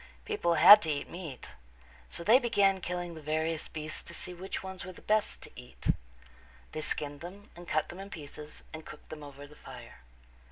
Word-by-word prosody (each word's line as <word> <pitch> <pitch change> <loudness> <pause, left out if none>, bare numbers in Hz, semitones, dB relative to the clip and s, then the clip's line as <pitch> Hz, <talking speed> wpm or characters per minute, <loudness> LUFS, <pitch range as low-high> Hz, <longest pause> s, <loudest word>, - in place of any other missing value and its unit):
People 170 -1 +1
had 205 +5 +11
to 160 - -2
eat 145 -2 -1
meat. 165 -8 -7 0.6
So - - -2
they 225 +7 +7
began 200 -6 +3
killing 175 -1 -3
the 160 - -9
various 155 +1 -1
beasts 155 0 -5
to 170 - -8
see 180 - -4
which 185 +2 -5
ones 190 -1 -6
were 185 - -6
the 180 - -15
best 215 0 +1
to - - -8
eat. 125 0 -7 0.8
They 155 - -3
skinned 145 -1 -2
them 195 +4 -10
and 175 0 -11
cut 155 -1 +1
them 175 - -8
in 195 +1 -7
pieces 150 -3 -9
and 160 0 -6
cooked - - -12
them 155 -1 -7
over 145 -1 -9
the 150 +1 -15
fire. - - -11
170 Hz, 200 wpm, -31 LUFS, 155-190 Hz, 0.8 s, had